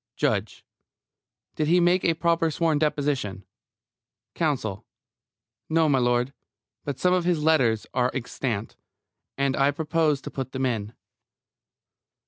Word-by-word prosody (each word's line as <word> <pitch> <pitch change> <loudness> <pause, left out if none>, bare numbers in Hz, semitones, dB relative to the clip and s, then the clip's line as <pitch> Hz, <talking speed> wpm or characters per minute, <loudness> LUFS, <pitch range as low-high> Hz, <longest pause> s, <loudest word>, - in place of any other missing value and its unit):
JUDGE: - - -1 0.9
Did 155 - -1
he 175 +3 +4
make 175 +1 +3
a 165 - +2
proper 165 0 +1
sworn 160 -1 +1
deposition? 140 -10 -1 0.9
COUNSEL: 130 - -1 0.9
No, 160 0 +3
m'lud. 125 -2 +2 0.5
But 145 - -4
some 180 0 +2
of 180 -1 +2
his 170 -3 +1
letters 130 -9 +3
are 125 -1 +2
extant, 120 -4 -4 0.6
and 140 -1 +1
I 135 +1 +3
propose 155 0 +1
to - - -8
put 130 -1 -5
them 130 0 -1
in. 110 -3 -2
145 Hz, 120 wpm, -25 LUFS, 125-160 Hz, 0.9 s, he